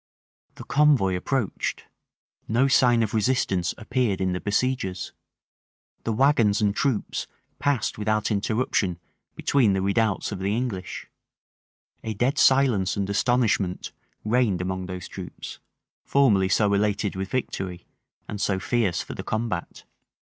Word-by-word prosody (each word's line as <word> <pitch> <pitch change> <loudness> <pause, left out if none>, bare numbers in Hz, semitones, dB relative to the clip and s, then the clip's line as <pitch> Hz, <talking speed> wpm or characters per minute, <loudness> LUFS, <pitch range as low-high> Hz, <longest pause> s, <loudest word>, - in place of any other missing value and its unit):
The - - -9
convoy 135 -10 +3
approached: 115 +4 -2 0.6
no 120 +5 +3
sign 120 -3 +4
of 110 - -3
resistance 105 -6 +1
appeared 115 -3 -1
in 95 -1 0
the 90 - -2
besiegers: 105 -3 -1 0.9
the 115 - 0
wagons 115 -4 +3
and 105 -2 +1
troops 130 -4 -1 0.3
passed 140 -6 0
without 110 +1 0
interruption 105 -3 0 0.4
between 120 -8 +2
the 95 - 0
redoubts 105 +1 0
of 100 - -5
the 100 +3 0
English: 105 -8 -4 1.0
a 110 -1 -4
dead 125 +7 +1
silence 125 -10 +3
and 100 -1 -1
astonishment 105 -5 +1 0.3
reigned 110 -4 +2
among 95 0 -3
those 90 -1 -6
troops, - - -8 0.4
formerly 105 -9 +3
so 100 +1 +3
elated 105 0 0
with 95 +1 -4
victory, 95 -8 -3 0.4
and 105 -1 -5
so 95 - +1
fierce 100 -4 0
for - - -8
the - - -6
combat. 110 -5 -3
105 Hz, 130 wpm, -25 LUFS, 95-125 Hz, 1.0 s, sign